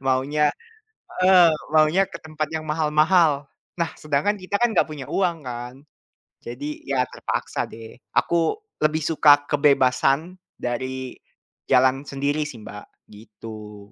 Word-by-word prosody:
maunya 140 Hz, +3 st, +2 dB, 0.8 s
heeh, 180 Hz, -2 st, +7 dB, 0.2 s
maunya 155 Hz, +4 st, +4 dB
ke -, -, -8 dB
tempat 155 Hz, -1 st, -4 dB
yang 160 Hz, -1 st, -3 dB
mahal-mahal. 155 Hz, -1 st, +2 dB, 0.3 s
Nah, 170 Hz, -2 st, 0 dB
sedangkan 155 Hz, +7 st, 0 dB
kita 185 Hz, +1 st, -5 dB
kan 240 Hz, -2 st, +3 dB
nggak -, -, +4 dB
punya 145 Hz, -4 st, -7 dB
uang 175 Hz, -4 st, 0 dB
kan? 120 Hz, 0 st, -6 dB, 0.7 s
Jadi, 145 Hz, +5 st, -6 dB
ya 135 Hz, -2 st, +1 dB
terpaksa -, -, -3 dB
deh. 110 Hz, 0 st, -11 dB, 0.2 s
Aku 170 Hz, -, +1 dB, 0.3 s
lebih 155 Hz, 0 st, +1 dB
suka 145 Hz, -3 st, +5 dB
kebebasan 140 Hz, +2 st, +2 dB, 0.3 s
dari 130 Hz, +1 st, -4 dB, 0.6 s
jalan 130 Hz, +1 st, +4 dB
sendiri 140 Hz, +2 st, -1 dB
sih, 130 Hz, -, -9 dB
Mbak, 105 Hz, 0 st, -9 dB, 0.3 s
gitu. 105 Hz, -1 st, -11 dB
145 Hz, 125 wpm, -23 LUFS, 130-155 Hz, 0.8 s, heeh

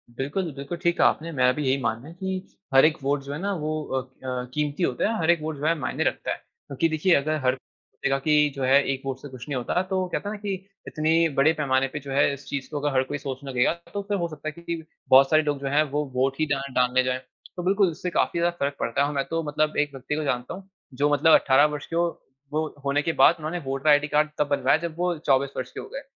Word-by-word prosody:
बिल्कुल, 150 Hz, +7 st, -2 dB
बिल्कुल, 140 Hz, +5 st, -5 dB
ठीक 170 Hz, 0 st, 0 dB
कहा -, -, +6 dB
आपने 165 Hz, +2 st, -1 dB
मेरा 125 Hz, 0 st, +5 dB
भी 150 Hz, -, -3 dB
यही 130 Hz, +1 st, +3 dB
मानना 115 Hz, +3 st, -2 dB
है 165 Hz, -, -10 dB
कि 190 Hz, +1 st, -5 dB, 0.2 s
हर 135 Hz, +2 st, +7 dB
एक 155 Hz, 0 st, +2 dB
वोट 140 Hz, +1 st, +1 dB
जो 140 Hz, -, -7 dB
है 145 Hz, -, -5 dB
ना 200 Hz, +1 st, -1 dB
वो 155 Hz, +1 st, -2 dB, 0.3 s
अ -, -, -3 dB, 0.3 s
अ, 125 Hz, -1 st, -2 dB
कीमती 150 Hz, +3 st, -1 dB
होता -, -, +1 dB
है, 225 Hz, -, -1 dB
हर 160 Hz, -, +1 dB
एक 170 Hz, -2 st, +1 dB
वोट 155 Hz, 0 st, -3 dB
जो 145 Hz, -, -4 dB
है 165 Hz, -, +4 dB
मायने -, -, -1 dB
रखता -, -, -1 dB
है। -, -, -2 dB
क्योंकि 145 Hz, +4 st, -4 dB
देखिये 160 Hz, +3 st, +3 dB
अगर 155 Hz, +2 st, +1 dB
हर 130 Hz, 0 st, +3 dB
कहेगा 135 Hz, +1 st, -4 dB
कि 150 Hz, +1 st, +3 dB
जो 135 Hz, -, -3 dB
है 135 Hz, +2 st, +5 dB
एक 135 Hz, -1 st, -3 dB
वोट 135 Hz, -1 st, -3 dB
से -, -, -8 dB
कुछ 130 Hz, -2 st, -10 dB
नहीं 140 Hz, -, -2 dB
होता 125 Hz, +8 st, 0 dB
तो 190 Hz, -1 st, 0 dB
वो 185 Hz, -, -1 dB
कहता 200 Hz, -, -3 dB
है 215 Hz, -, -4 dB
ना -, -, -10 dB
कि 205 Hz, -2 st, -2 dB, 0.3 s
इतनी 160 Hz, +2 st, +2 dB
बड़े 155 Hz, +4 st, +5 dB
पैमाने 135 Hz, -4 st, +1 dB
पे 150 Hz, -, -3 dB
जो 140 Hz, -1 st, -9 dB
है 140 Hz, +1 st, +3 dB
इस 140 Hz, 0 st, -10 dB
चीज 140 Hz, -1 st, -4 dB
को 150 Hz, -, -4 dB
अगर 145 Hz, 0 st, -1 dB
हर 130 Hz, -, +4 dB
कोई 145 Hz, +2 st, -4 dB
सोचने 135 Hz, 0 st, -6 dB
लगेगा 125 Hz, +3 st, +2 dB, 0.2 s
तो 205 Hz, -, -2 dB
फिर 205 Hz, -1 st, 0 dB
हो 170 Hz, -2 st, -1 dB
सकता 155 Hz, -1 st, -8 dB
है -, -, -1 dB
कि 170 Hz, -, -14 dB
कि 160 Hz, -, -8 dB, 0.3 s
बहुत 135 Hz, +1 st, +7 dB
सारे 155 Hz, 0 st, +4 dB
लोग 145 Hz, -2 st, -1 dB
जो 140 Hz, -, -4 dB
है 145 Hz, +3 st, +3 dB
वो 150 Hz, +1 st, +1 dB
वोट 130 Hz, +1 st, +1 dB
ही 155 Hz, -, +3 dB
ना 140 Hz, -2 st, +1 dB
डालने 125 Hz, 0 st, +3 dB
जाये। 130 Hz, 0 st, -1 dB, 0.4 s
तो 180 Hz, -, -4 dB
बिल्कुल 195 Hz, +1 st, +3 dB
उससे 170 Hz, +3 st, -4 dB
काफ़ी 170 Hz, -, 0 dB
ज़्यादा 175 Hz, 0 st, +1 dB
फ़र्क 140 Hz, 0 st, -1 dB
पड़ता 115 Hz, +4 st, 0 dB
है 140 Hz, -, +3 dB
और 150 Hz, -, -4 dB
मैं 140 Hz, -1 st, 0 dB
तो 165 Hz, 0 st, -1 dB
मतलब 155 Hz, 0 st, 0 dB
एक 145 Hz, 0 st, +1 dB
व्यक्ति 135 Hz, +2 st, -4 dB
को 155 Hz, -, -2 dB
जानता 125 Hz, -3 st, -2 dB
हूँ 195 Hz, +1 st, -11 dB, 0.2 s
जो 145 Hz, +3 st, +1 dB
मतलब 155 Hz, +3 st, +5 dB
18 135 Hz, +2 st, +5 dB
वर्ष 145 Hz, -1 st, -5 dB
के 165 Hz, -, -5 dB
हो 170 Hz, +1 st, +3 dB, 0.5 s
वो 155 Hz, +1 st, 0 dB, 0.2 s
होने 140 Hz, +1 st, +2 dB
के 165 Hz, +2 st, -1 dB
बाद 170 Hz, -, +7 dB
उन्होंने 160 Hz, +3 st, -3 dB
वोटर 135 Hz, 0 st, -1 dB
आईडी 145 Hz, 0 st, +5 dB
कार्ड 150 Hz, +1 st, +2 dB
तब 150 Hz, -, +1 dB
बनवाया 145 Hz, +1 st, +3 dB
जब 160 Hz, -, -11 dB
वो 175 Hz, -1 st, 0 dB
24 140 Hz, -3 st, +2 dB
वर्ष 130 Hz, 0 st, -4 dB
के -, -, -8 dB
हो -, -, -7 dB
गए। 275 Hz, -, -4 dB
145 Hz, 280 wpm, -25 LUFS, 135-165 Hz, 0.5 s, हर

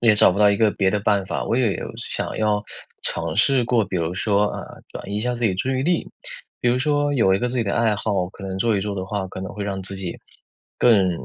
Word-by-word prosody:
也 115 Hz, -2 st, +5 dB
找 105 Hz, -, +6 dB
不 100 Hz, -, -3 dB
到 105 Hz, 0 st, +6 dB
一 100 Hz, -, +2 dB
个 110 Hz, -1 st, +3 dB
别 95 Hz, -1 st, +1 dB
的 105 Hz, -, 0 dB
办 100 Hz, -2 st, +1 dB
法。 -, -, -2 dB
我 115 Hz, -, 0 dB
也 120 Hz, -6 st, +2 dB
有 -, -, -6 dB
想 -, -, -4 dB
要 105 Hz, -1 st, +1 dB, 0.4 s
尝 85 Hz, -1 st, -2 dB
试 125 Hz, +3 st, +4 dB
过， 115 Hz, -2 st, +2 dB
比 95 Hz, -1 st, -4 dB
如 85 Hz, 0 st, -1 dB
说， 105 Hz, +1 st, +2 dB
啊， -, -, -5 dB, 0.3 s
转 -, -, -8 dB
移 100 Hz, -, -2 dB
一 -, -, -1 dB
下 125 Hz, +2 st, -1 dB
自 120 Hz, -, -2 dB
己 105 Hz, -, +3 dB
注 115 Hz, +8 st, -1 dB
意 130 Hz, -, 0 dB
力。 175 Hz, +4 st, 0 dB, 0.5 s
比 120 Hz, -, +2 dB
如 125 Hz, +1 st, +2 dB
说 145 Hz, +1 st, +1 dB
有 95 Hz, -7 st, +4 dB
一 -, -, +1 dB
个 125 Hz, -, 0 dB
自 125 Hz, -, -3 dB
己 115 Hz, -, +1 dB
的 100 Hz, -, -1 dB
爱 115 Hz, -3 st, +2 dB
好， 100 Hz, -4 st, -1 dB
可 95 Hz, 0 st, -9 dB
能 95 Hz, 0 st, -4 dB
做 110 Hz, +1 st, +2 dB
一 -, -, 0 dB
做 100 Hz, +1 st, -3 dB
的 95 Hz, -1 st, -3 dB
话， 100 Hz, -1 st, -3 dB
可 95 Hz, -, -7 dB
能 95 Hz, -, -6 dB
会 105 Hz, 0 st, -5 dB
让 95 Hz, -1 st, -3 dB
自 95 Hz, +1 st, -5 dB
己， 95 Hz, -3 st, -5 dB, 0.6 s
更 100 Hz, -6 st, +5 dB
105 Hz, 300 characters per minute, -22 LUFS, 95-120 Hz, 0.6 s, 找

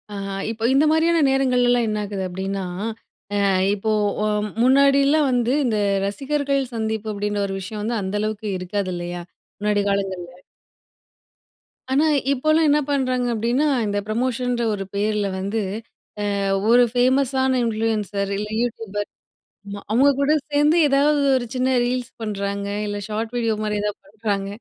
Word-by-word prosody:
ஆஹா. 195 Hz, 0 st, -4 dB, 0.2 s
இப்போ 225 Hz, 0 st, -7 dB
இந்தமாரியான 320 Hz, +4 st, +3 dB
நேரங்கள்லலாம் 250 Hz, -3 st, +2 dB
என்னாகுது 205 Hz, -2 st, -3 dB
அப்பிடின்னா, 190 Hz, +2 st, -4 dB, 0.8 s
அ -, -, +1 dB, 0.3 s
இப்போ, 215 Hz, +2 st, -1 dB, 0.3 s
ஒம் 210 Hz, 0 st, 0 dB
முன்னாடிலாம் 280 Hz, +2 st, +4 dB
வந்து 245 Hz, 0 st, +1 dB
இந்த 220 Hz, -4 st, +1 dB, 0.3 s
ரசிகர்கள் 275 Hz, +4 st, -1 dB
சந்திப்பு 220 Hz, -1 st, -2 dB
அப்பிடின்ற 205 Hz, 0 st, -2 dB
ஒரு 195 Hz, -, -4 dB
விஷயம் 205 Hz, +3 st, -6 dB
வந்து 230 Hz, +2 st, -1 dB
அந்த 190 Hz, 0 st, -4 dB
அளவுக்கு 215 Hz, 0 st, -3 dB
இருக்காது, 185 Hz, +1 st, -3 dB
இல்லயா! 175 Hz, 0 st, -5 dB, 0.4 s
முன்னாடி 210 Hz, 0 st, +1 dB
காலங்கள்ல. 190 Hz, -3 st, -2 dB, 1.6 s
ஆனா, 280 Hz, +4 st, +3 dB, 0.3 s
இப்போலாம் 310 Hz, +4 st, +3 dB
என்ன 295 Hz, +1 st, +4 dB
பண்ணுறாங்க 255 Hz, -3 st, 0 dB
அப்பிடின்னா, 240 Hz, +7 st, +1 dB, 0.2 s
இந்த 205 Hz, 0 st, -1 dB
ப்ரமோஷன்ற 245 Hz, +1 st, -1 dB
ஒரு 195 Hz, -1 st, -3 dB
பேர்ல 210 Hz, 0 st, 0 dB
வந்து, 200 Hz, +3 st, -2 dB, 0.8 s
அ -, -, -1 dB, 0.3 s
ஒரு 245 Hz, +1 st, +7 dB
ஃபேமஸான 260 Hz, +1 st, +2 dB
இன்ஃப்ளூயென்சர். 215 Hz, -3 st, -1 dB
இல்ல, 210 Hz, +1 st, -3 dB
YouTubeபர் 220 Hz, -4 st, -3 dB, 0.6 s
ஆமா. 200 Hz, 0 st, -6 dB
அவுங்ககூட 280 Hz, +4 st, +3 dB, 0.2 s
சேர்ந்து, 295 Hz, +3 st, +3 dB
ஏதாவது 285 Hz, +2 st, +3 dB, 0.2 s
ஒரு 240 Hz, -, -3 dB
சின்ன 255 Hz, +1 st, +1 dB
ரீல்ஸ் 250 Hz, 0 st, -2 dB
பண்ணுறாங்க 200 Hz, -1 st, -3 dB, 0.2 s
இல்ல 205 Hz, 0 st, -3 dB
ஷார்ட் 220 Hz, +2 st, -3 dB
வீடியோ 230 Hz, -2 st, +1 dB
மாரி 210 Hz, 0 st, -1 dB
எதாவது 210 Hz, 0 st, -3 dB
பண்ணுறாங்க. 205 Hz, -1 st, -3 dB
225 Hz, 130 wpm, -22 LUFS, 205-260 Hz, 1.6 s, ஒரு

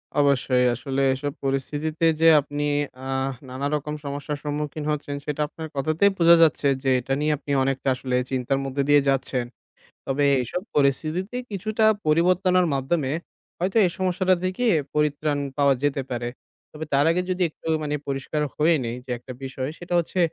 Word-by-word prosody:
অবশ্যই। 135 Hz, -3 st, +3 dB
আসলে 135 Hz, +2 st, -3 dB
এসব 145 Hz, +1 st, -4 dB
পরিস্থিতিতে 150 Hz, +4 st, -1 dB, 0.2 s
যে 165 Hz, -, +6 dB
আপনি 145 Hz, +1 st, -4 dB, 0.4 s
আহ 135 Hz, 0 st, -1 dB, 0.2 s
নানারকম 145 Hz, +3 st, -2 dB
সমস্যার 145 Hz, +1 st, -4 dB
সম্মুখীন 150 Hz, +1 st, -3 dB
হচ্ছেন 145 Hz, -1 st, -3 dB
সেটা 150 Hz, 0 st, -2 dB
আপনার 160 Hz, +1 st, -8 dB
কথাতেই 155 Hz, +8 st, +2 dB
বোঝা 170 Hz, 0 st, +7 dB
যাচ্ছে 150 Hz, -2 st, +2 dB, 0.2 s
যে, 135 Hz, -, +1 dB
এটা 135 Hz, +2 st, -3 dB
নিয়ে 150 Hz, 0 st, +2 dB
আপনি 145 Hz, -, -7 dB
অনেকটা 135 Hz, 0 st, -2 dB
আসলে 125 Hz, 0 st, -3 dB, 0.2 s
চিন্তার 130 Hz, +1 st, 0 dB
মধ্যে 135 Hz, +1 st, -1 dB
দিয়ে 145 Hz, 0 st, +6 dB
যাচ্ছেন। 130 Hz, -2 st, 0 dB, 0.6 s
তবে 140 Hz, +2 st, 0 dB, 0.2 s
এইসব 125 Hz, +8 st, -3 dB
পরিস্থিতিতে 155 Hz, -, +1 dB, 0.2 s
কিছুটা 215 Hz, +3 st, 0 dB, 0.2 s
পরিবর্তনের 180 Hz, +3 st, +3 dB
মাধ্যমে, 135 Hz, +1 st, 0 dB, 0.5 s
হয়তো 190 Hz, +5 st, 0 dB
এই -, -, +2 dB
সমস্যাটা 185 Hz, 0 st, +2 dB
থেকে 185 Hz, +7 st, -1 dB, 0.3 s
পরিত্রাণ 150 Hz, 0 st, +1 dB, 0.2 s
পাওয়া 140 Hz, -1 st, +4 dB
যেতে 145 Hz, -1 st, +1 dB
পারে। 120 Hz, -1 st, -3 dB, 0.4 s
তবে 155 Hz, +1 st, -6 dB
তার 140 Hz, +1 st, +4 dB
আগে 180 Hz, +2 st, +1 dB
যদি 185 Hz, 0 st, -1 dB
একটু 155 Hz, -, -13 dB, 0.2 s
মানে 150 Hz, 0 st, -1 dB
পরিষ্কার 140 Hz, +2 st, -2 dB
হয়ে 160 Hz, +2 st, +3 dB
নেই 115 Hz, +1 st, -3 dB
যে 130 Hz, -, -6 dB
একটা 125 Hz, +2 st, -11 dB
বিষয়, 130 Hz, +1 st, -4 dB
সেটা 175 Hz, 0 st, -6 dB
হচ্ছে, 175 Hz, +2 st, -3 dB
145 Hz, 160 wpm, -24 LUFS, 135-165 Hz, 0.6 s, বোঝা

